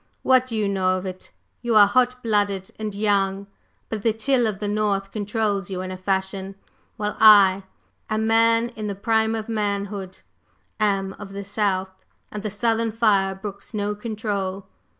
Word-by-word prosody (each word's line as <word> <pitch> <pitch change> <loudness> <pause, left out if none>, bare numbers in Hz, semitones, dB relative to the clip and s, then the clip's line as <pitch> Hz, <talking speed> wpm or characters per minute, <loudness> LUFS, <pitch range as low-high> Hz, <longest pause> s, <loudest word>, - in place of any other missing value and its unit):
What 255 -1 +4
do 230 - -4
you 215 -2 0
know 185 -1 +1
of 185 - -6
it? 185 -1 -7 0.3
You 240 -2 0
are 210 -1 +9
hot 250 +4 +1
blooded 205 -4 0
and 215 -2 -4
young; 200 -1 +1 0.4
but 220 -2 -4
the 225 +1 +2
chill 245 +2 +1
of 210 -3 -3
the 205 - -4
North 205 -2 -1
controls 205 -2 -1
you 185 -1 -4
in 185 0 -5
a - - -4
fashion, 190 +1 -2 0.4
while 210 0 -2
I 200 -3 +7 0.4
a 215 - 0
man 230 +1 +3
in 220 -3 -6
the 200 - -3
prime 220 +2 +1
of 220 -1 -4
manhood 200 -3 -3 0.6
am 195 -2 0
of 195 -1 -9
the 200 0 -5
South, 190 -2 -2 0.3
and 210 - -5
the 215 - -3
Southern 225 +2 0
fire 200 -4 +2
brooks 200 +3 -8
no 205 0 -1
control. 205 -3 -4
205 Hz, 170 wpm, -23 LUFS, 195-220 Hz, 0.6 s, are